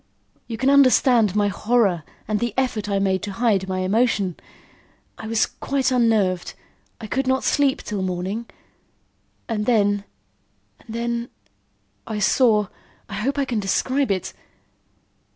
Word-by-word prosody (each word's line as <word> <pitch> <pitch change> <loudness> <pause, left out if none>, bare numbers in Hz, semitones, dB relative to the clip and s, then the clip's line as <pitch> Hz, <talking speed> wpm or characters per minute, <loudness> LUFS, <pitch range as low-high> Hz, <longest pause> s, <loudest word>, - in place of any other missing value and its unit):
You 230 - -5
can 265 +3 +2
understand 255 -6 +4
my 205 -1 +3
horror 210 -5 +1 0.3
and 210 0 0
the 235 -2 -2
effort 230 -6 -1
I 200 - +1
made 190 -2 +1
to 205 - -5
hide 200 -4 +1
my 185 0 -1
emotion. 200 -2 +1 0.8
I 220 - -6
was 225 0 +2
quite 270 -2 -2
unnerved. 220 -7 +1 0.4
I 225 - -7
could 260 +5 -2
not 260 0 +1
sleep 280 -2 +1
till 205 -3 -4
morning, 185 +5 -3 1.0
and 215 -3 -2
then 205 -4 +2 0.8
and 225 - -10
then 235 0 -2 0.8
I 220 -2 -3
saw 210 -1 +3 0.4
I - - -8
hope 245 +8 -2
I 280 - +1
can 240 -4 -2
describe 255 +7 0
it." 190 -3 -2
220 Hz, 140 wpm, -22 LUFS, 200-245 Hz, 1.0 s, understand